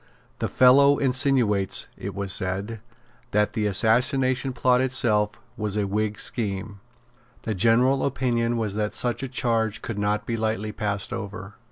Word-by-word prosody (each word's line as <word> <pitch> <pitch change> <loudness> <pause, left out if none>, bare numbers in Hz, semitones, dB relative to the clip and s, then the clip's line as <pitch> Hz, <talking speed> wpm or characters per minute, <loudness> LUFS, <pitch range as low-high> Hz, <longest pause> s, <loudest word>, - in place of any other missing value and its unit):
"The - - -1
fellow 140 +3 +5
insinuates," 125 -7 +2
it - - -7
was 100 -1 0
said, 100 +4 -1 0.5
"that 105 -1 0
the 110 -3 -1
Assassination 130 +6 +2
Plot 125 0 +2
itself 110 -5 0 0.2
was 105 -3 -2
a 105 - 0
Whig 105 +1 -2
scheme." 100 -2 -3 0.6
The 110 - -2
general 120 +6 +3
opinion 120 -3 -1
was 110 -3 -2
that 105 0 -3
such 120 -1 -2
a 135 - -3
charge 115 -4 -1
could 110 -3 -5
not 105 +1 -1
be 115 - -2
lightly 110 -1 -2
passed 105 -2 -3
over. 100 -1 -7
110 Hz, 150 wpm, -24 LUFS, 105-125 Hz, 0.6 s, fellow